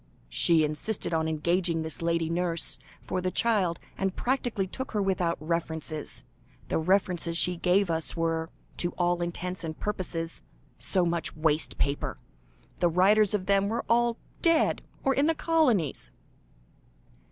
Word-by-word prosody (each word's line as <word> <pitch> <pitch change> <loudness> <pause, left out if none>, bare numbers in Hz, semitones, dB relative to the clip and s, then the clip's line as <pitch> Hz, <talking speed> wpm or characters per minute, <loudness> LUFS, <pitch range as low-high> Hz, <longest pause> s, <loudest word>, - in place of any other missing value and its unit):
"She 160 - +3
insisted 155 +6 -2
on 160 0 +1
engaging 165 +1 +1
this 160 0 -1
lady 165 -1 +1
nurse 170 0 0 0.2
for 185 - -2
the 185 - 0
child, 195 -5 +2 0.2
and 195 -1 -1
practically 245 -6 0
took 260 +8 -6
her 210 - +1
without 185 -4 +1
references. 160 -1 -3 0.5
The - - +1
references 175 -1 +1
she 180 +1 +4
gave 180 +1 +2
us, 160 +1 -2
were, 165 0 0 0.3
to 175 0 0
all 175 0 +1
intents 175 +1 -3
and 155 -1 -5
purposes, 170 -5 -3 0.4
so 185 -2 +2
much 170 -1 -1
waste 155 0 0
paper. 140 0 -1 0.6
The 175 - +3
writers 200 +4 +4
of 190 -3 -2
them 200 0 +3
were 230 - -2
all 235 0 +3 0.2
dead, 330 -1 +3 0.2
or 270 - +3
in 280 +3 +2
the 325 - +2
colonies." 285 - +1
175 Hz, 145 wpm, -28 LUFS, 165-200 Hz, 0.6 s, she